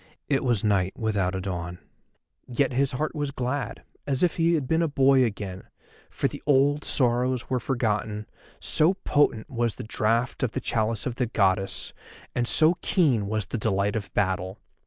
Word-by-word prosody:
It 140 Hz, -2 st, +1 dB
was 120 Hz, -6 st, +1 dB
night 100 Hz, -3 st, +1 dB
without 100 Hz, -4 st, 0 dB
a 95 Hz, -, -3 dB
dawn. 90 Hz, -2 st, -4 dB, 0.7 s
Yet 130 Hz, +1 st, 0 dB
his 135 Hz, +1 st, +1 dB
heart 150 Hz, +4 st, -2 dB
was 145 Hz, -3 st, -2 dB
glad, 135 Hz, +1 st, -3 dB, 0.2 s
as 135 Hz, +1 st, 0 dB
if 175 Hz, -, +2 dB
he 170 Hz, 0 st, +3 dB
had 145 Hz, -5 st, -2 dB
been 160 Hz, +4 st, +2 dB
a 165 Hz, -, +2 dB
boy 135 Hz, -2 st, +4 dB
again, 100 Hz, -5 st, -4 dB, 0.4 s
for -, -, -1 dB
the -, -, -8 dB
old 145 Hz, +1 st, +3 dB
sorrows 125 Hz, 0 st, +2 dB
were 130 Hz, -, +1 dB
forgotten, 110 Hz, -4 st, -1 dB, 0.3 s
so 165 Hz, +5 st, +3 dB
potent 145 Hz, -, +1 dB
was 120 Hz, -3 st, -1 dB
the -, -, -7 dB
draught 115 Hz, +1 st, 0 dB
of 125 Hz, -3 st, -1 dB
the -, -, -1 dB
chalice 110 Hz, -1 st, -1 dB
of 125 Hz, -2 st, -3 dB
the 125 Hz, -, 0 dB
Goddess, 95 Hz, -3 st, 0 dB, 0.4 s
and 120 Hz, -1 st, 0 dB
so 160 Hz, +5 st, +4 dB
keen 130 Hz, -, +2 dB
was 110 Hz, -1 st, -1 dB
the 115 Hz, +4 st, -4 dB
delight 100 Hz, -1 st, 0 dB
of 105 Hz, -3 st, -4 dB
battle. 95 Hz, 0 st, -1 dB
120 Hz, 180 wpm, -26 LUFS, 105-135 Hz, 0.7 s, boy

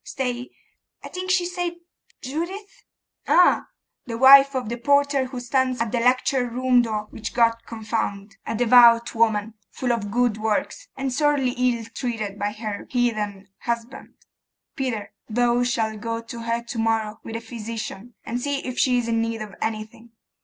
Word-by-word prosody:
Stay, 250 Hz, -1 st, -4 dB, 0.5 s
I -, -, -7 dB
think 370 Hz, 0 st, -5 dB
she 370 Hz, -1 st, +3 dB
said 355 Hz, -1 st, -3 dB, 0.5 s
Judith.' 380 Hz, -, -5 dB, 0.4 s
'Ah! 360 Hz, -, +4 dB, 0.4 s
the 230 Hz, -1 st, -4 dB
wife 275 Hz, +2 st, +8 dB
of 255 Hz, -3 st, -2 dB
the 235 Hz, +2 st, -3 dB
porter 280 Hz, +1 st, +2 dB
who 255 Hz, -1 st, -6 dB
stands 255 Hz, +1 st, 0 dB
at 230 Hz, -2 st, -1 dB
the 240 Hz, -, 0 dB
lecture 250 Hz, +1 st, +2 dB
room 250 Hz, +1 st, +3 dB
door, 215 Hz, -3 st, -2 dB
which 220 Hz, 0 st, -6 dB
God 230 Hz, -1 st, +5 dB
confound! 215 Hz, -2 st, -4 dB
A -, -, -2 dB
devout 235 Hz, 0 st, +6 dB
woman, 220 Hz, -1 st, +1 dB, 0.2 s
full 250 Hz, +4 st, -2 dB
of 210 Hz, -3 st, -3 dB
good 240 Hz, 0 st, +1 dB
works, 220 Hz, -, -2 dB
and 270 Hz, -1 st, -2 dB
sorely 285 Hz, -2 st, +2 dB
ill 245 Hz, -2 st, 0 dB
treated 220 Hz, -6 st, -4 dB
by 205 Hz, 0 st, -1 dB
her 210 Hz, -1 st, -6 dB
heathen 210 Hz, -5 st, -1 dB
husband. 235 Hz, +1 st, -5 dB, 0.6 s
Peter, 245 Hz, -6 st, -3 dB, 0.2 s
thou 240 Hz, +2 st, +2 dB
shalt 225 Hz, -3 st, -1 dB
go 230 Hz, 0 st, -2 dB
to 230 Hz, +1 st, -8 dB
her 230 Hz, +1 st, -2 dB
to 235 Hz, 0 st, -6 dB
morrow 225 Hz, -1 st, 0 dB
with 225 Hz, -, -7 dB
the -, -, -2 dB
physician, 225 Hz, -1 st, -7 dB
and 240 Hz, +2 st, -3 dB
see 280 Hz, +1 st, -2 dB
if 255 Hz, -1 st, -4 dB
she 250 Hz, -2 st, +3 dB
is 240 Hz, -1 st, -1 dB
in 230 Hz, -1 st, +1 dB
need 225 Hz, -1 st, -2 dB
of 210 Hz, -2 st, -10 dB
anything. 220 Hz, +1 st, -5 dB
235 Hz, 165 wpm, -23 LUFS, 225-255 Hz, 0.6 s, wife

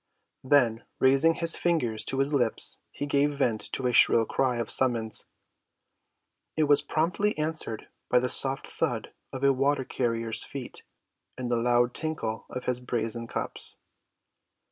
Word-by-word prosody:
Then 125 Hz, -4 st, +2 dB
raising 135 Hz, +5 st, +3 dB
his 165 Hz, 0 st, +2 dB
fingers 125 Hz, -11 st, -1 dB
to 135 Hz, -, +1 dB
his 135 Hz, +2 st, +2 dB
lips 120 Hz, -5 st, +2 dB
he 145 Hz, -, -6 dB
gave 145 Hz, 0 st, 0 dB
vent 115 Hz, -6 st, 0 dB
to 130 Hz, -, -3 dB
a 125 Hz, -, 0 dB
shrill 115 Hz, -1 st, +5 dB
cry 125 Hz, +1 st, -1 dB
of 115 Hz, -2 st, -3 dB
summons. 115 Hz, -4 st, +2 dB, 1.3 s
It 155 Hz, -, +3 dB
was 145 Hz, -1 st, +4 dB
promptly 180 Hz, +6 st, -1 dB
answered 155 Hz, -7 st, -3 dB, 0.2 s
by 125 Hz, -, +3 dB
the 125 Hz, +1 st, +1 dB
soft 135 Hz, +1 st, +4 dB
thud -, -, -3 dB, 0.2 s
of 130 Hz, 0 st, -7 dB
a 140 Hz, 0 st, +4 dB
water‐carrier's 125 Hz, -4 st, 0 dB
feet 135 Hz, -3 st, -8 dB, 0.6 s
and 125 Hz, -1 st, -4 dB
the -, -, +2 dB
loud 120 Hz, +1 st, +1 dB
tinkle 150 Hz, -9 st, -4 dB
of 125 Hz, -, -6 dB
his 125 Hz, -1 st, -1 dB
brazen 115 Hz, -1 st, -3 dB
cups. -, -, -1 dB
130 Hz, 145 wpm, -27 LUFS, 115-145 Hz, 1.3 s, shrill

